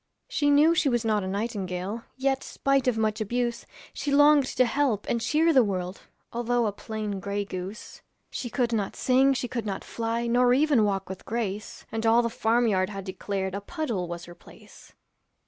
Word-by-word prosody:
She 290 -2 +1
knew 295 +3 +6
she 315 -4 +2
was 240 -2 0
not 215 -2 +2
nightingale, 195 0 -3 0.2
Yet 270 0 0
spite 275 -2 0
of 245 -3 +2
much 215 0 0
abuse, 235 +2 -2 0.3
She 285 - -3
longed 290 -1 +6
to 255 - +2
help 245 -4 0
and 235 - 0
cheer 320 +7 +3
the 260 -3 +6
world, 185 -2 -3 0.3
Although 240 0 +1
a 210 - 0
plain 210 -1 -5
gray 200 +1 -3
goose. 190 +4 -7 0.3
She 245 - -4
could 240 -1 0
not 205 -3 -1
sing, 265 +1 +3
she 250 - -2
could 235 -3 -4
not 195 -1 -3
fly, 230 +1 -2
Nor 245 +1 +4
even 280 -6 +3
walk 195 -1 -1
with 190 0 -8
grace, 215 -2 -4
And 225 0 -3
all 230 +1 +4
the 235 - -1
farm 230 +2 +2
yard 185 -3 +1
had 195 -2 -6
declared 190 0 -3
A 200 - -3
puddle 230 - -3
was 170 0 -6
her 175 - -11
place. 175 - -17
225 Hz, 190 wpm, -26 LUFS, 200-255 Hz, 0.3 s, knew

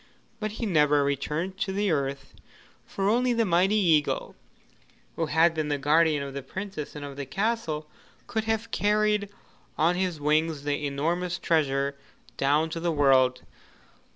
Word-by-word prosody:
But 215 -1 -3
he 230 - -4
never 150 -6 +3
returned 150 +7 -2
to 215 -3 -1
the 200 0 0
earth, 135 -2 -2 0.5
for 195 0 -2
only 245 +3 +2
the 230 -1 +1
mighty 185 +3 +3
eagle, 165 -8 +1 0.8
who 165 - -1
had 160 +2 +3
been 155 -2 -2
the 145 -1 0
guardian 150 +1 +3
of 140 -1 -7
the 140 - -4
Princess 185 +2 -7
and 145 -1 -6
of 140 -1 -9
the 140 - -4
castle, 190 - -2 0.4
could 220 0 -2
have 225 0 -2
carried 210 0 +1 0.5
on 170 +3 +3
his 180 -3 -1
wings 155 0 +1
the 145 0 -1
enormous 170 +5 -1
treasure 140 -3 0 0.4
down 150 +5 +1
to 165 - -3
the 170 0 0
world. 130 -4 +3
160 Hz, 155 wpm, -27 LUFS, 145-195 Hz, 0.8 s, never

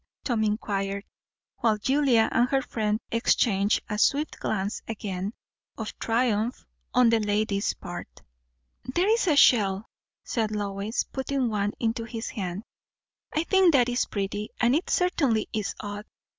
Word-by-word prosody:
Tom 235 -4 0
inquired, 200 -2 -1 0.5
while 220 -2 +2
Julia 260 -1 +3
and 240 +1 +3
her 270 -1 +1
friend 215 -2 -1
exchanged 210 -3 +2
a 210 -1 -3
swift 290 +6 +1
glance 200 0 -2
again, 200 -3 -4 0.5
of 220 -2 -5
triumph 230 0 0 0.3
on 250 -2 +5
the 230 - +4
lady's 210 -1 0
part. - - -9 0.6
"There 345 +10 0
is 450 -1 +2
a 310 - +4
shell," 205 -7 +4 0.4
said 225 -3 -1
Lois, 205 +1 -2
putting 265 -2 -2
one 205 -1 -1
into 230 0 -1
his 230 0 -5
hand. 190 -2 -4 0.7
"I 310 - 0
think 375 -1 +4
that 250 -3 +4
is 245 0 +1
pretty, 205 +1 -3
and 240 +2 +4
it 325 - -1
certainly 280 - +2
is 215 -2 -2
odd. 205 0 -6
220 Hz, 145 wpm, -26 LUFS, 205-250 Hz, 0.7 s, on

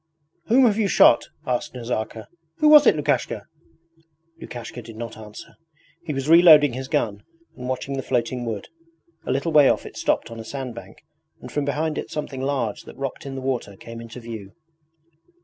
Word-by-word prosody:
'Whom 250 +3 +5
have 220 -2 +2
you 210 - +2
shot?' 120 - +5 0.2
asked 125 0 -2
Nazarka. 115 -2 -4 0.3
'Who 305 - +4
was 300 -3 +8
it, - - +6
Lukashka?' 140 -7 -1 0.9
Lukashka 120 0 -8
did 115 -1 -12
not 115 -1 -6
answer. 105 -1 -11 0.5
He 165 - -4
was 135 -1 -3
reloading 155 -5 +7
his 130 +1 -5
gun 105 -5 -1 0.3
and 125 -1 -7
watching 135 +1 -3
the - - -1
floating 125 -1 -1
wood. 110 -4 -5 0.6
A - - 0
little 140 +5 -1
way 150 -3 +6
off - - 0
it - - -10
stopped - - 0
on 115 - -8
a - - -6
sand 130 +1 -6
bank, - - -12 0.4
and - - -10
from 145 -1 -1
behind 150 +2 -1
it - - -6
something 140 -3 -5
large 135 -6 -2
that - - -12
rocked 135 0 -5
in 135 - -6
the 135 - -5
water 125 -6 -3
came 115 +2 -9
into 115 +1 -9
view. 110 -4 -8
130 Hz, 185 wpm, -23 LUFS, 115-145 Hz, 0.9 s, was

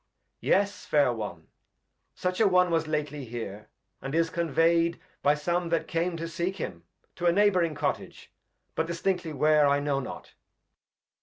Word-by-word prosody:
Yes, 200 0 +1
Fair 145 -5 +3
One, 95 -8 -6 0.7
such 180 0 -2
a 220 - +5
one 180 -2 +4
was 165 -1 +1
lately 150 -2 -2
here. 110 -3 -7 0.3
And 135 +3 -4
is 165 0 +2
convey'd 170 0 +2 0.2
by 145 +1 +4
some 170 +3 -1
that 165 -1 0
came 170 +1 -1
to 165 +1 -4
seek 175 +3 -2
him, 85 - -6 0.3
To 175 - 0
a - - +6
Neighb'ring 180 -4 +3
Cottage; - - -3 0.4
but 160 - -1
distinctly 170 0 -1
where, 150 0 +4
I 140 0 +3
know 145 -1 0
not. 135 - -8
165 Hz, 155 wpm, -28 LUFS, 145-175 Hz, 0.7 s, a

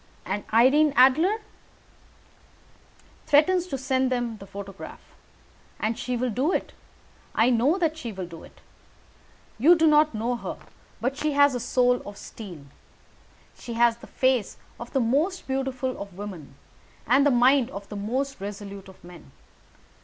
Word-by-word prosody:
"And 200 +2 -3
Irene 270 +6 +5
Adler?" 315 - +4 1.9
"Threatens 345 +5 +4
to 275 - -3
send 260 -1 0
them 240 -3 -2
the 195 - -12
photograph. 195 0 -10 0.7
And 220 +2 -1
she 245 +1 -3
will 250 0 -1
do 265 - 0
it. - - -2 0.6
I 235 +3 +4
know 255 +9 +2
that 325 -4 0
she 240 -7 -5
will 190 -3 -6
do 170 -2 -11
it. - - -17 1.0
You 325 +9 +7
do 325 -1 +2
not 305 -3 +4
know 235 +3 -1
her, - - -6 0.4
but 265 +3 -2
she 305 0 -1
has 285 -1 +5
a 245 - -2
soul 250 +1 +2
of 205 0 -10
steel. 175 -10 -10 0.9
She 240 - -8
has 235 0 +3
the - - -14
face 255 -5 0 0.2
of 235 - -8
the 270 - +1
most 295 +11 0
beautiful 265 -1 -2
of 200 -2 -9
women 180 -9 -8 0.5
and 255 +5 +4
the 290 - +4
mind 255 0 +4
of 200 -6 -8
the 210 - -7
most 255 +5 -3
resolute 200 -1 -7
of 190 - -17
men. 175 -4 -13
250 Hz, 155 wpm, -25 LUFS, 205-275 Hz, 1.9 s, You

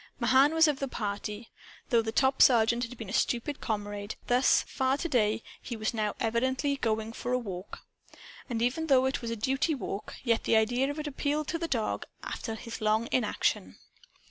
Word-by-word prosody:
Mahan 275 +4 +4
was 320 0 +6
of 290 -2 0
the 275 - -2
party. 210 -1 -5 0.4
Though 235 -3 +4
the 220 0 -3
top 265 +3 +2
sergeant 235 -1 +5
had 240 +1 -10
been 220 -4 -7
a - - -6
stupid 255 +4 0
comrade, 205 -1 -3
thus 250 +2 +4
far 265 0 0
to 340 - -2
day, 225 -6 +1 0.2
he 240 - -5
was 215 +2 -1
now 215 -2 -1
evidently 260 +5 0
going 220 -3 -1
for 245 +2 -3
a - - +3
walk. 195 -6 -7 0.7
And 230 -2 -1
even 275 +7 0
though 260 -3 +5
it 265 0 -1
was 235 - -4
a 230 - -2
duty 270 +8 0
walk, 210 -6 -5
yet 230 -3 +1
the - - +3
idea 245 +5 +2
of 290 - -4
it 305 - -4
appealed 295 +1 -1
to 330 - -2
the 335 - -2
dog 230 -8 -2 0.2
after 225 - -4
his 230 +1 -8
long 215 +2 +1
inaction. 235 -5 0
240 Hz, 195 wpm, -29 LUFS, 220-270 Hz, 0.7 s, was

